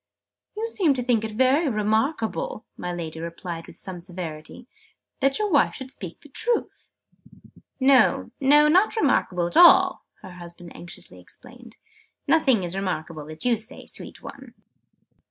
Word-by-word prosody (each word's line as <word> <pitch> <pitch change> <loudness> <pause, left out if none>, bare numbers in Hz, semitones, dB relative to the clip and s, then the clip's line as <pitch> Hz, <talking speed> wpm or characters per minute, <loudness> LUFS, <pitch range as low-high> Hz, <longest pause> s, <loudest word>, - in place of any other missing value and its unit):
"You 450 +1 -2
seem 360 -11 +1
to 250 - -1
think 240 -3 +1
it 220 - -3
very 260 +8 +2
remarkable," 225 - -1
my 180 - -5
Lady 165 -2 -6
remarked 170 0 -7
with - - -9
some 180 -2 -7
severity, 170 +3 -8 0.5
"that 275 -1 +2
your 420 -2 -1
wife 290 - +3
should 265 -1 -7
speak 185 -10 -8
the 295 - -16
truth!" 465 - -2 0.9
"No, 260 -3 +4
not 300 +10 +4
remarkable 180 - +1
at 170 - -5
all!" 370 +1 +6 0.2
her 185 - -10
husband 175 -1 -12
anxiously 165 - -9
explained. 240 - -15 0.5
"Nothing 265 - +3
is 175 +1 -4
remarkable 165 -5 -4
that 155 +5 -8
you 245 -1 +3
say, 220 0 -6
sweet - - -8
one!" - - -11
225 Hz, 145 wpm, -24 LUFS, 175-285 Hz, 0.9 s, all